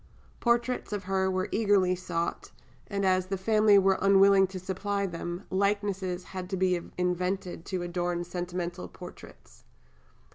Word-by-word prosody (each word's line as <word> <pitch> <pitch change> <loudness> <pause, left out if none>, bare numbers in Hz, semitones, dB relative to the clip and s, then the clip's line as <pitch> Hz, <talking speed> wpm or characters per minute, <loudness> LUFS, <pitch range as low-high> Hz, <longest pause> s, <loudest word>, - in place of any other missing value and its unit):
Portraits 240 0 0
of 205 -1 -3
her 190 0 0
were 185 0 -1
eagerly 200 -4 +3
sought; 175 -2 -3 0.4
and 200 -1 -1
as 185 -1 +2
the 195 0 -2
family 215 +1 +4
were 195 0 +3
unwilling 195 0 +6
to 190 0 -7
supply 200 +2 -2
them, 175 0 -5
likenesses 195 -2 0
had 185 -1 -7
to 190 - -2
be 180 -1 +2 0.2
invented 180 0 -2
to 185 -2 -3
adorn 175 0 -2
sentimental 175 0 -4
prints. 180 - -13
190 Hz, 140 wpm, -28 LUFS, 180-200 Hz, 0.4 s, unwilling